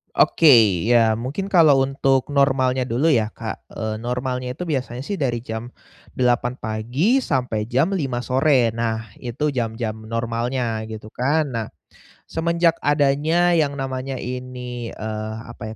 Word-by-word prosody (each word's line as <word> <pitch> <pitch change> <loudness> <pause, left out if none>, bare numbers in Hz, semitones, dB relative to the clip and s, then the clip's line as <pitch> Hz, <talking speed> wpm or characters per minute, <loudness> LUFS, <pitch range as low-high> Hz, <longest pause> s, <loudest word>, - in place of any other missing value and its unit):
Oke, 165 - +4 0.4
ya, 115 -2 +4
mungkin 145 +11 -4
kalau 155 -7 +6
untuk 135 0 +1
normalnya 130 -2 +2
dulu, 130 +8 +1
ya, 110 -6 +1
Kak, 110 -1 -7
eee, 110 -1 -4
normalnya 125 +1 -3
itu 180 - -7
biasanya 130 -6 -3
sih 195 +5 -4
dari 120 -5 -1
jam 110 +1 -6 0.4
8.00 125 0 +1
pagi, 125 - 0
sampai 125 - -1
jam 135 - +1
5.00 135 -10 -2
sore, 130 -2 +3
nah, 115 -1 -3
itu 130 +5 -2
jam-jam 110 -3 -3
normalnya, 115 0 -2
gitu 110 -1 -9
kan. 145 +5 0
Nah, 115 -3 -3 0.7
semenjak 170 +1 +1
adanya 150 +4 +2
yang 150 -4 +2
namanya 135 -1 -4
ini, 125 -1 -6
eee, 110 0 -4 0.2
apa 110 +1 -8
125 Hz, 135 wpm, -22 LUFS, 115-140 Hz, 0.7 s, kalau